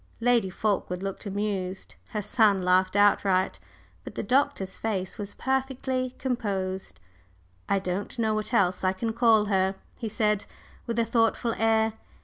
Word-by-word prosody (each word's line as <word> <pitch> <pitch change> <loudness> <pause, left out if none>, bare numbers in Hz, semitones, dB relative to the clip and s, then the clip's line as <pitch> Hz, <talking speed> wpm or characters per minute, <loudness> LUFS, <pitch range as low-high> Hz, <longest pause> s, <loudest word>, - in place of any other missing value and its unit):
Lady 235 -4 +3
Fulkeward 190 -2 -1
looked 195 +2 -5
amused; 195 -2 -3 0.2
her 210 -1 -3
son 205 -3 +3
laughed 185 +1 +3
outright. 200 -2 +3 0.4
But - - -9
the - - -3
Doctor's 260 -7 +1
face 195 -4 -3
was 205 -1 -5
perfectly 260 -1 -1
composed. 195 - -3 0.7
"I 200 - +3
don't 190 +3 -3
know 220 -2 +1
what 215 0 -2
else 185 -1 +2
I 185 0 +2
can 225 +4 -2
call 225 -3 +4
her," 190 -1 +1 0.2
he 225 - -4
said, 210 -1 +1 0.4
with 230 -1 -2
a 230 - +3
thoughtful 230 0 +1
air. 220 0 +2
210 Hz, 145 wpm, -27 LUFS, 190-230 Hz, 0.7 s, call